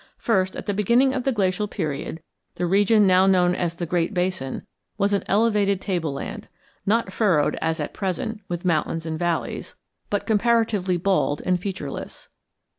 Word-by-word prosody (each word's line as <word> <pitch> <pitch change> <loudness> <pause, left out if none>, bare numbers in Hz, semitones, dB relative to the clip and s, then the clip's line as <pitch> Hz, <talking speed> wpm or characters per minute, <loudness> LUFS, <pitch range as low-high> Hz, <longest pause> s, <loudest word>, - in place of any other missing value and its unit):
First, 190 -5 +1
at - - -6
the 205 - -1
beginning 235 +7 +3
of 260 -2 -2
the 270 - +3
glacial 200 -2 0
period 160 -3 -4 0.3
the 180 - -1
region 205 +4 +4
now 185 0 +5
known 180 -2 +4
as 175 -2 -2
the 175 - -3
Great 175 +3 -1
Basin 180 -7 -2 0.3
was 200 0 +1
an 200 - +1
elevated 205 -2 +2
tableland, 165 -8 -4 0.4
not 215 -2 +1
furrowed 180 -10 +2
as 160 0 -1
at 150 - -4
present 210 +3 -3
with 175 0 -4
mountains 165 -1 0
and 160 -1 -3
valleys, 175 -2 -2 0.3
but 205 - -1
comparatively 220 -4 +2
bald 175 -5 +1
and 180 -1 +2
featureless. 180 -7 -6
185 Hz, 160 wpm, -24 LUFS, 170-210 Hz, 0.4 s, now